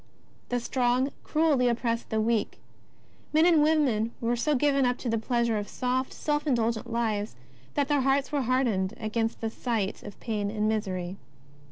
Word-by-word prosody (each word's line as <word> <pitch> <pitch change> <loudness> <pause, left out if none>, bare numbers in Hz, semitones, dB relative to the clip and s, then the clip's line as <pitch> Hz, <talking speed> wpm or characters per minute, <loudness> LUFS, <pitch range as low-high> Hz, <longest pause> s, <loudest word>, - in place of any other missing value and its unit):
The 245 - 0
strong 250 +2 +1
cruelly 305 -5 +2
oppressed 235 -1 -1
the 220 - 0
weak. 220 0 0 0.8
Men 315 +2 +5
and 335 -3 +5
women 275 -8 +2
were 235 +1 0
so 295 +5 +1
given 275 0 +3
up 245 0 +1
to 245 - -4
the 225 0 +1
pleasure 235 -1 0
of 205 - -5
soft, 255 +1 -1
self 295 0 -2
indulgent 235 -2 0
lives, 220 -3 -1 0.4
that 285 -1 +1
their 290 -1 +2
hearts 270 +1 +1
were 290 -2 +1
hardened 230 -6 +1
against 225 +1 -2
the 225 -1 -2
sight 225 -5 -2
of 205 - -10
pain 210 -3 -2
and 210 0 -1
misery. 190 -4 -2
235 Hz, 170 wpm, -28 LUFS, 220-270 Hz, 0.8 s, Men